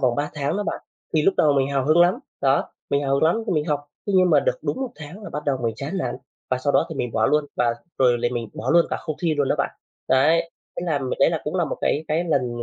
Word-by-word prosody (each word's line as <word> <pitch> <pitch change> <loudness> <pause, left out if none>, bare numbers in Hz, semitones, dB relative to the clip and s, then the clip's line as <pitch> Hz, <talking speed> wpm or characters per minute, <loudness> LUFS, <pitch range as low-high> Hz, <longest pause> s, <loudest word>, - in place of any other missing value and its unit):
vòng 125 -2 +2
3 145 +1 -2
tháng 145 +4 -1
đó 205 - -1
bạn. - - -3 0.3
Thì 155 - +3
lúc 195 - +3
đầu 150 - +4
mình 135 -1 +2
hào 135 -2 0
hứng 155 +3 +5
lắm, 175 +2 +4 0.2
đó, 135 0 +2 0.2
mình 140 0 +2
hào 135 -1 +1
hứng 140 - +1
lắm 160 +4 +4
thì - - 0
mình 150 -3 +1
học. 145 -2 -2 0.2
Thế 200 - -1
nhưng 185 -1 +5
mà - - +6
được - - 0
đúng - - -2
1 265 -2 -2
tháng 155 +7 -10
là 205 - -8
bắt 150 0 -5
đầu 140 -3 0
mình 115 -1 0
chán 140 - -5
nản - - -2 0.3
và 130 - +1
sau 140 +2 0
đó - - +3
thì 160 - -6
mình 125 -4 -3
bỏ 110 - +2
luôn, 150 -1 +2
và 120 -1 +2 0.2
rồi 125 -2 +4
thì 120 - +3
mình 120 -3 -3
bỏ 125 - -2
luôn 170 0 +5
cả - - 0
không 155 -2 -5
thi 165 -3 +2
luôn 140 -2 +1
đó - - +3
bạn. - - 0 0.4
Đấy, 160 +5 +3 0.3
thế - - -3
là, 155 -4 +1
ừm, 130 -2 -4
đấy 140 - +5
cũng 150 - -3
là 175 - +2
một 150 - -4
cái 155 +2 0
cái 160 +3 +1
lần 125 -7 0
145 Hz, 300 wpm, -23 LUFS, 135-165 Hz, 0.4 s, mà